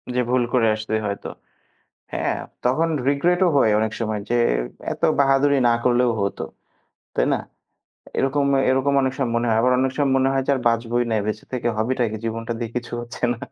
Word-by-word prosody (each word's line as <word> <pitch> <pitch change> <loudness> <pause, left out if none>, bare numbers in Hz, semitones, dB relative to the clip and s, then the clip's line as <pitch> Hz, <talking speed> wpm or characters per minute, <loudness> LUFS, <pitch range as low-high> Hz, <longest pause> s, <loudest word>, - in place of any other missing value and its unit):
যে - - +2
ভুল 125 -1 +2
করে 115 -3 +3
আসছে 110 0 -5
হয়তো। 100 0 -4 0.9
হ্যাঁ, - - -1 0.3
তখন 155 +7 +2 0.2
রিগ্রেটও 175 +6 +2
হয় 110 - +4
অনেক 110 0 0
সময় 110 -2 -2
যে - - +2 0.6
এত - - -9 0.2
বাহাদুরি 140 +1 +3
না - - +4
করলেও 125 0 +3
হত। 100 0 -2 0.8
তাই - - +2
না? - - +1 0.8
এরকম, 140 +1 +1 0.2
এরকম 135 +2 +2
অনেক 130 0 0
সময় 130 -4 -1
মনে 120 +1 +1
হয়। 110 -1 +2
আবার 125 - +3
অনেক 130 0 +1
সময় 140 -2 +2
মনে 130 0 +2
হয় 135 -1 +1
যে - - +3
আর - - -2
বাঁচবইনা। 115 0 0
এ - - -1
বেঁচে 110 0 -4
থেকে 120 -1 -1
হবেটা 125 +3 0
কি? 110 - -4
জীবনটা 115 +1 -3
দিয়ে 115 -2 -4
কিছু 120 -1 -6
হচ্ছে 120 0 -10
না। 120 - -9
125 Hz, 190 wpm, -22 LUFS, 115-135 Hz, 0.9 s, হয়